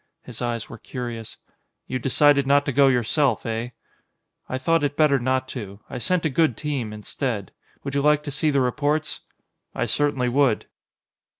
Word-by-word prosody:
His 125 -1 -8
eyes 120 -2 -2
were 115 - -10
curious. 120 -3 -6 0.5
"You 130 - -3
decided 140 +2 +4
not 140 +1 +4
to 140 - 0
go 140 +1 +5
yourself, 135 +3 +2
eh?" 115 +1 -2 0.8
"I 130 - -1
thought 165 +4 +1
it 145 +1 -1
better 150 -3 +4
not 130 +1 0
to. 100 -5 -7
I - - -4
sent 180 +5 0
a - - +3
good 150 -4 +2
team, 140 -8 -3
instead. 105 0 -4 0.3
Would 140 - -4
you 140 - +1
like 150 0 +3
to 145 - -5
see 155 +3 +1
the 140 -2 +2
reports?" 150 +4 0 0.6
"I - - 0
certainly 145 -4 +1
would." 130 -2 +2
135 Hz, 175 wpm, -24 LUFS, 120-145 Hz, 0.8 s, go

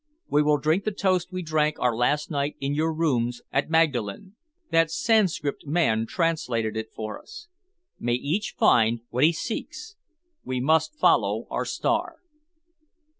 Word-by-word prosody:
We 145 - +3
will 150 0 +3
drink 155 +7 +1
the 215 - -1
toast 190 -2 0
we 185 0 -4
drank 155 -1 0
our 125 -2 +1
last 145 +7 0
night 145 0 -1
in 140 +1 -2
your 160 +2 0
rooms 125 -7 -1
at 140 - 0
Magdalen. 160 - 0 0.4
That 165 -1 +3
Sanscrit 165 -6 0
man 125 -8 +1
translated 125 - -1
it 110 0 -5
for 110 -1 -6
us: 345 - -12 0.5
'May 120 0 -1
each 150 - -2
find 115 0 +3
what 125 +3 +1
he 165 - +5
seeks!' 235 - -6 0.5
We 130 -1 -3
must 160 - +2
follow - - +2
our - - -1
star." - - -1
150 Hz, 150 wpm, -25 LUFS, 125-165 Hz, 0.5 s, he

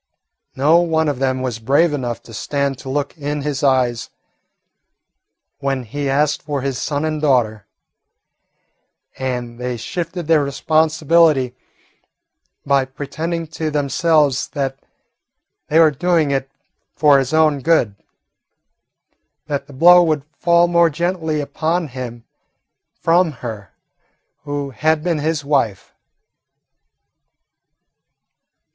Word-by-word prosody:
No 155 +5 +4
one 160 -2 +1
of 145 -4 -2
them 130 -1 0
was 120 -3 -3
brave 145 +8 +2
enough 120 -4 -4
to 115 - -14
stand 140 +3 -2
to 135 - -8
look 140 +1 -2
in 145 0 -3
his 145 -2 -2
eyes 125 -4 +1 1.5
when 135 -2 -2
he 140 +5 -4
asked 150 +2 +1
for 145 -2 -3
his 135 -2 -3
son 145 +1 -2
and 155 -1 -2
daughter, 115 -8 +1 1.5
and 125 -2 -4
they 125 -1 -3
shifted 170 - -5
their 155 -2 +3
responsibility 155 -2 +2 1.1
by 140 -1 +3
pretending 155 +5 -4
to 160 -1 -3
themselves 145 -1 +1
that 135 -2 -3 0.9
they 155 - +1
were 160 -2 +6
doing 160 0 +1
it 135 -1 -1 0.5
for 145 -3 +5
his 135 -1 -2
own 155 -2 +3
good: 135 -9 +2 1.5
that 140 -1 -4
the - - -13
blow 175 +6 +7
would 155 -4 +1
fall 170 +1 +3
more 170 -1 +4
gently 160 -1 -2
upon 160 +3 -2
him 120 -2 -7 0.8
coming 170 +1 +3
from - - -6
her 105 -5 -7 0.7
who 145 -1 -4
had 155 +4 0
been 170 -3 0
his 155 -1 -2
wife. 135 -9 -1
145 Hz, 120 wpm, -19 LUFS, 130-160 Hz, 1.5 s, blow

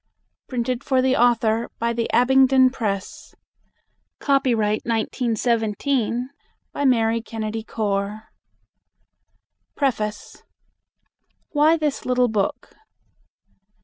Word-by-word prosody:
PRINTED 250 0 -2
FOR 265 -2 +1
THE 260 0 +2
AUTHOR 230 -1 +2
BY 235 0 -1
THE 230 0 -2
ABINGDON 260 +1 +4
PRESS 200 -7 -5 0.8
Copyright, 235 -7 +1
1917, 235 +2 -1 0.4
by 285 - -2
Mary 230 -3 +2
Kennedy 225 -1 -5
Core. 210 0 -3 1.5
Preface. 215 -7 -2 1.1
WHY 310 +2 +3
THIS 300 -3 -2
LITTLE 250 -1 +2
BOOK. 205 -3 -2
235 Hz, 80 wpm, -22 LUFS, 220-260 Hz, 1.5 s, ABINGDON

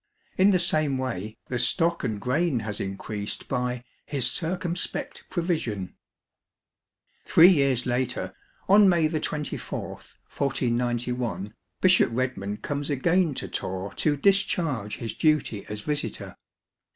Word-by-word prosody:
In 190 +2 +5
the 190 - +4
same 155 -5 +1
way 110 -5 -4
the 125 - -2
stock 170 +3 +2
and 110 -2 -2
grain 130 +2 0
has 105 -2 -4
increased 100 +1 -5
by 125 -1 -2
" - - -41
his 140 -4 0
circumspect 175 +1 -3
pro 175 - -2
vision." 115 - -2 1.3
Three 170 +3 +8
years 140 -8 +3
later, 125 0 -1 0.3
on 200 0 +7
May 170 -3 +3
24, 150 -1 -3
1491, 120 -5 -2 0.3
Bishop 185 0 +5
Redman 115 -5 -2
comes 145 +3 -4
again 165 +3 +2
to 100 - -3
Torre 95 +2 -4
to 150 -2 +1
discharge 160 - +1
his 115 - -4
duty 150 -10 +1
as 105 0 -5
visitor. 145 +4 -3
130 Hz, 125 wpm, -26 LUFS, 115-165 Hz, 1.3 s, Three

